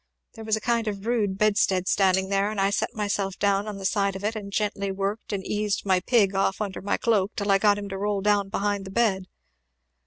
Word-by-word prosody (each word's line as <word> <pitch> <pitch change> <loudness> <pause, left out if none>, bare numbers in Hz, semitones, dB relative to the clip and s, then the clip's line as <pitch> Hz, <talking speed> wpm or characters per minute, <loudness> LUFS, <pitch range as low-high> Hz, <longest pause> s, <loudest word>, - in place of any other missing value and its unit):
There 225 - -10
was 220 0 +1
a - - -3
kind 235 0 0
of 205 -2 -2
a - - -13
rude 210 -5 0
bedstead 200 -3 +2
standing 190 -1 +2
there; 200 +1 +1
and 215 -1 -4
I 195 +1 +2
set 230 - -1
myself 200 -2 -2
down 200 0 +1
upon 210 -2 -5
the 195 - -7
side 200 -1 +1
of 190 - -7
it, 215 +2 -1
and 200 -2 -6
gently 200 -1 -1
worked 195 +4 -3
and 195 -2 -3
eased 210 -1 -1
my 190 -2 +3
pig 205 -2 +2
off 195 0 0
under 205 -3 -4
my 200 - 0
cloak 215 -3 +1
till 200 -1 0
I 195 - +4
got 205 0 +4
him 205 0 -5
to 195 0 -5
roll 205 0 -1
down 205 -1 +2
behind 200 0 -1
the - - -7
bed. 195 -4 +1
200 Hz, 245 wpm, -25 LUFS, 195-210 Hz, -, I